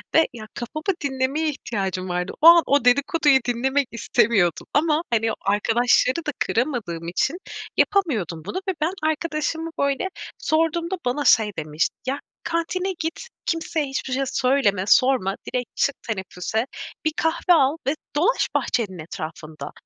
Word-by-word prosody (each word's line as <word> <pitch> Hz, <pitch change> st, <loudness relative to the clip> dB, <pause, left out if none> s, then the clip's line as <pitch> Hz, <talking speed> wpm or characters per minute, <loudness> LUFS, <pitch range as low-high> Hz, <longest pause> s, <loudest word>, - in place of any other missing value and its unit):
ve 320 Hz, -, +6 dB
ya, 220 Hz, -3 st, -9 dB
kafamı 310 Hz, +6 st, -6 dB, 0.2 s
dinlemeye 275 Hz, +3 st, 0 dB
ihtiyacım 190 Hz, -9 st, -3 dB
vardı. 180 Hz, +1 st, -2 dB
O 320 Hz, -, +8 dB
an, 340 Hz, 0 st, +9 dB
o 280 Hz, -3 st, +2 dB
dedikoduyu 280 Hz, +2 st, +4 dB
dinlemek 265 Hz, +3 st, +1 dB
istemiyordum 210 Hz, -6 st, +1 dB
ama 305 Hz, +1 st, +3 dB
hani, 225 Hz, 0 st, +2 dB
o -, -, -4 dB
arkadaşları 230 Hz, +5 st, +2 dB
da 300 Hz, -, 0 dB
kıramadığım 225 Hz, -, -1 dB
için, 265 Hz, -, 0 dB, 0.4 s
yapamıyordum 220 Hz, -, +1 dB
bunu 205 Hz, -, -4 dB
ve -, -, +1 dB
ben 325 Hz, +4 st, +1 dB
arkadaşıma 320 Hz, +1 st, -2 dB
böyle 280 Hz, +5 st, +1 dB, 0.3 s
sorduğumda 330 Hz, +3 st, 0 dB
bana 270 Hz, +4 st, 0 dB
şey 215 Hz, -2 st, +5 dB
demişti: 155 Hz, 0 st, -1 dB
Ya, 275 Hz, +2 st, -1 dB, 0.2 s
kantine 350 Hz, +3 st, -1 dB
git, 330 Hz, +9 st, -4 dB, 0.2 s
kimseye 330 Hz, -2 st, -1 dB
hiçbir 270 Hz, -1 st, -3 dB
şey 275 Hz, -, +1 dB
söyleme, 250 Hz, -8 st, +1 dB
sorma, 250 Hz, -6 st, +4 dB, 0.2 s
direkt 250 Hz, -2 st, -2 dB
çık 280 Hz, -, +1 dB
teneffüse, 210 Hz, +1 st, -2 dB, 0.4 s
bir 310 Hz, -, +3 dB
kahve 330 Hz, +2 st, +2 dB
al 290 Hz, 0 st, +3 dB
ve 280 Hz, -, +2 dB, 0.2 s
dolaş 360 Hz, +12 st, +2 dB
bahçenin 200 Hz, -7 st, -1 dB
etrafında. 155 Hz, -1 st, -7 dB
265 Hz, 140 wpm, -23 LUFS, 210-315 Hz, 0.4 s, an